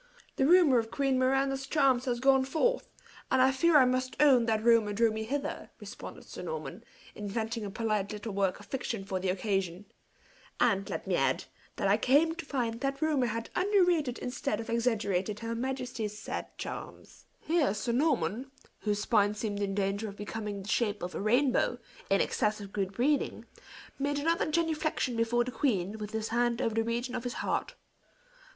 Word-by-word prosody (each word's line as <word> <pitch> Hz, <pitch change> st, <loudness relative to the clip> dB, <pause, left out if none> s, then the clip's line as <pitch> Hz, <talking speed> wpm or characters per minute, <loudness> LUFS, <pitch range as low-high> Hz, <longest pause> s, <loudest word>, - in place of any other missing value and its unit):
"The 270 Hz, -, +3 dB
rumor 330 Hz, -7 st, +6 dB
of 225 Hz, -1 st, -3 dB
Queen 270 Hz, 0 st, +1 dB
Miranda's 270 Hz, +1 st, +1 dB
charms 270 Hz, -4 st, +3 dB
has 245 Hz, -2 st, -1 dB
gone 265 Hz, +1 st, +4 dB
forth; 405 Hz, -, 0 dB, 0.4 s
and 260 Hz, -, +3 dB
I 260 Hz, +1 st, +5 dB
fear 320 Hz, +4 st, +4 dB
I 265 Hz, -, +7 dB
must 255 Hz, +1 st, 0 dB
own 260 Hz, -6 st, +5 dB
that 220 Hz, -1 st, +1 dB
rumor 230 Hz, -3 st, +4 dB
drew 225 Hz, +2 st, +3 dB
me 220 Hz, 0 st, -3 dB
hither," 280 Hz, +5 st, -3 dB
responded -, -, -9 dB
Sir -, -, -9 dB
Norman, 475 Hz, 0 st, -6 dB, 0.3 s
inventing 220 Hz, +2 st, -3 dB
a -, -, -4 dB
polite 215 Hz, -1 st, -1 dB
little 210 Hz, 0 st, -5 dB
work 195 Hz, -1 st, 0 dB
of 205 Hz, -, -13 dB
fiction 230 Hz, -5 st, -3 dB
for 190 Hz, -2 st, -2 dB
the 185 Hz, 0 st, -1 dB
occasion; 190 Hz, -1 st, -1 dB, 0.7 s
"and, 200 Hz, -5 st, +2 dB
let -, -, -4 dB
me -, -, 0 dB
add, -, -, +1 dB, 0.3 s
that -, -, 0 dB
I 200 Hz, +2 st, +4 dB
came 290 Hz, +8 st, +3 dB
to 335 Hz, -1 st, -7 dB
find 235 Hz, -4 st, -2 dB
that 275 Hz, 0 st, -1 dB
rumor 300 Hz, -5 st, +2 dB
had 230 Hz, +1 st, -4 dB
under 395 Hz, +1 st, +3 dB
rated 310 Hz, -8 st, +1 dB
instead 250 Hz, -3 st, -3 dB
of 230 Hz, 0 st, -5 dB
exaggerated 210 Hz, -4 st, 0 dB
her 230 Hz, 0 st, -3 dB
majesty's 245 Hz, -3 st, -3 dB
said -, -, -5 dB
charms." -, -, -8 dB
Here 320 Hz, -, +1 dB
Sir 225 Hz, +3 st, -2 dB
Norman, 250 Hz, -, 0 dB, 0.3 s
whose 210 Hz, -1 st, -1 dB
spine 210 Hz, -2 st, +3 dB
seemed 210 Hz, -1 st, -3 dB
in 195 Hz, -1 st, -1 dB
danger 200 Hz, +2 st, -1 dB
of 200 Hz, -, -10 dB
becoming 210 Hz, -1 st, -5 dB
the -, -, -11 dB
shape 210 Hz, -3 st, 0 dB
of 180 Hz, -, -4 dB
a -, -, -4 dB
rainbow, 245 Hz, +3 st, +2 dB, 0.3 s
in 195 Hz, -, +4 dB
excess 210 Hz, 0 st, 0 dB
of 200 Hz, -1 st, -9 dB
good 195 Hz, -2 st, -1 dB
breeding, 275 Hz, +7 st, 0 dB, 0.5 s
made 285 Hz, +1 st, 0 dB
another 325 Hz, +2 st, +1 dB
genuflection 310 Hz, -5 st, 0 dB
before 230 Hz, +1 st, +2 dB
the 250 Hz, -, -5 dB
queen, 220 Hz, -7 st, -1 dB
with 210 Hz, -1 st, -5 dB
his 220 Hz, 0 st, -3 dB
hand 240 Hz, 0 st, +1 dB
over 225 Hz, -, 0 dB
the 225 Hz, +1 st, +1 dB
region 240 Hz, +2 st, -2 dB
of 250 Hz, -2 st, -3 dB
his 245 Hz, -1 st, -3 dB
heart. -, -, -1 dB
235 Hz, 185 wpm, -30 LUFS, 210-270 Hz, 0.7 s, I